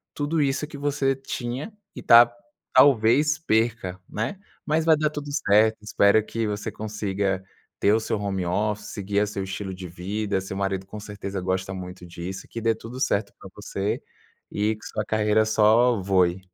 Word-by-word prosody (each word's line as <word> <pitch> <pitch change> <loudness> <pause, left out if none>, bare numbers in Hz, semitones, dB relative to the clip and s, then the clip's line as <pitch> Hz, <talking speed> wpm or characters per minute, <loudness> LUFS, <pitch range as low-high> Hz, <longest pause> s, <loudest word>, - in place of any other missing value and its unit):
tudo 150 +2 -1
isso 140 +2 -1
que 150 - -9
você 140 -1 0
tinha 135 - -5 0.2
e - - -7
ta 120 0 +8 0.4
talvez 140 +4 +5
perca, 110 - 0
né. 115 - -3 0.3
Mas 155 +1 +1
vai 160 -1 +6
dar 150 0 +1
tudo 145 -1 -6
certo. 110 -5 +4
Espero 105 0 +4
que 115 0 -2
você 105 0 -3
consiga 100 -3 -2 0.4
ter 100 - +4
o 110 - +3
seu 110 -1 -2
home 95 -3 -2
office, 105 +3 -1
seguir 100 0 -1
a - - +3
seu 100 -1 -4
estilo 95 0 -5
de 90 -1 -7
vida. 100 +4 -2
Seu 95 0 -6
marido 95 -1 -2
com 105 +2 -8
certeza 100 -2 -6
gosta 95 +1 -2
muito 90 -1 -8
disso, 90 +2 -7
que 115 - -6
dê 115 0 +2
tudo 115 +3 -9
certo 110 -5 0
pra - - -11
você 100 +1 -3 0.5
e 105 +2 0
que 105 - -15
sua 105 - -3
carreira 110 0 +2
só 110 +2 +4
voe. 95 -1 +1
105 Hz, 180 wpm, -25 LUFS, 95-120 Hz, 0.5 s, ta